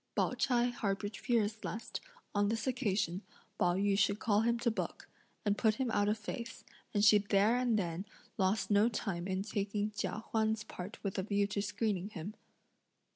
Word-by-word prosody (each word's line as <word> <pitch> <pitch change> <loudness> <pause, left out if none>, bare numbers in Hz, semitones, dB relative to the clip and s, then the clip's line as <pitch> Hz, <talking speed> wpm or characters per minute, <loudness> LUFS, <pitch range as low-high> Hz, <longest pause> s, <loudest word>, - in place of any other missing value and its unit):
Pao - - +2
ch'ai 245 -2 +2
harboured 205 -2 -2
fears 220 -3 0
lest, 225 - -4 0.3
on 205 0 +2
this 225 0 -1
occasion, 210 -8 0 0.4
Pao 175 0 +3
yü 200 +1 +2
should 200 +1 +3
call 210 -1 +2
him 235 +1 +2
to 235 0 +1
book, 225 - -4 0.4
and 205 0 +1
put 220 -2 +3
him 255 -1 -1
out 205 -1 +2
of 215 - +1
face, 230 +3 -6 0.3
and 205 -1 +3
she 210 0 +8
there 205 +3 +3
and 245 -3 +2
then 180 0 -2 0.3
lost 195 +2 +1
no 205 +3 +5
time 185 -6 -3
in 190 0 -1
taking 205 0 -1
Chia 215 +1 -3
Huan's 220 0 +1
part 195 -1 -7
with 195 -2 -2
a - - +2
view 200 +1 +1
to 200 0 -2
screening 205 -2 -1
him. 200 0 -6
210 Hz, 180 wpm, -34 LUFS, 200-225 Hz, 0.4 s, she